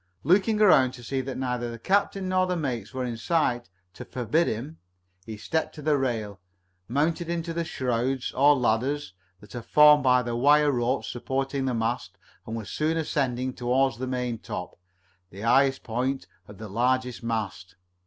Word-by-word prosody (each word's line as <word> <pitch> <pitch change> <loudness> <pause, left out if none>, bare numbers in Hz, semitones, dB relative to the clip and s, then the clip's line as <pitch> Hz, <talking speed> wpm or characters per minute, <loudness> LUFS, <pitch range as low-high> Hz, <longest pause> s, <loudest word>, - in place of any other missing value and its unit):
Looking 205 +5 +3
around 145 -12 +5
to 120 - -11
see 135 +3 -2
that 130 0 -6
neither 125 -2 -2
the 115 - -7
captain 195 - 0
nor 185 0 +2
the 180 - -1
mates 125 -9 -3
were 130 -1 -3
in 120 -2 -4
sight 120 -3 0 0.2
to - - -9
forbid 130 +7 0
him, 135 +9 -4 0.5
he 110 -1 -6
stepped 160 +9 -2
to 150 - -9
the 150 0 +3
rail, 115 -7 -2 0.5
mounted 160 +7 0
Into 170 -1 -3
the 170 0 -1
shrouds, 130 -3 -2
or 145 +2 +5
ladders, 130 +2 0 0.3
that 105 -1 -15
are 120 - -5
formed 150 +3 +6
by 125 -1 +4
the 120 -1 -3
wire 145 +4 +4
ropes 125 +1 -1
supporting 135 +2 -2
the 130 -2 -1
mast, 115 -4 -2 0.3
and 110 - -4
was 110 -3 -6
soon 155 +2 0
ascending 130 -5 -1
toward 125 0 0
the 130 - -3
maintop, 125 -7 -4 0.6
the 95 +3 -11
highest 135 +4 +3
point 130 +4 -2 0.2
of 105 - -12
the 110 - -8
largest 125 +4 0
mast. 105 -6 -4
130 Hz, 175 wpm, -26 LUFS, 120-145 Hz, 0.6 s, formed